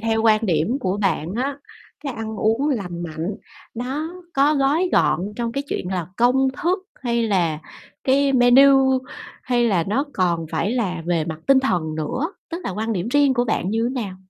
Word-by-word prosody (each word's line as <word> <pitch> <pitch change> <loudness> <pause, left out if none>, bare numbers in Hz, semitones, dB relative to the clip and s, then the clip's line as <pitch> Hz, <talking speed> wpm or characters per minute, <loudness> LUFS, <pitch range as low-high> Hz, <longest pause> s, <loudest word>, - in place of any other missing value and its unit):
theo 225 0 0
quan 220 -1 +3
điểm 175 - +1
của 190 -2 -1
bạn 185 -3 -1
á, 275 +3 -2 0.4
cái 280 -3 -4
ăn 220 -2 -5
uống 225 +7 +1
lành 180 - -3
mạnh 170 +4 -4 0.4
nó 270 +7 -3 0.2
có 285 +3 +4
gói 295 +6 +2
gọn 180 +7 +2
trong 235 -1 -2
cái 275 - -2
chuyện 180 - -3
là 180 -3 -2
công 255 +3 +3
thức 355 +4 +2 0.2
hay 235 -2 0
là 175 -8 +1 0.5
cái 275 +1 +3
menu, 265 +1 +6 0.4
hay 245 -2 +1
là 180 -6 +1
nó 265 +7 +1
còn 170 -3 0
phải 210 - 0
là 185 -9 -2
về 170 -3 +1
mặt 160 -1 -6
tinh 270 -1 +5
thần 170 -11 -1
nữa, 250 - -3 0.2
tức 335 +2 -5
là - - -2
quan 220 +4 -2
điểm 195 +2 -2
riêng 285 0 +3
của 245 -1 +1
bạn 205 -4 -1
như 225 +2 0
nào? 200 -7 -4
230 Hz, 190 wpm, -22 LUFS, 185-265 Hz, 0.5 s, menu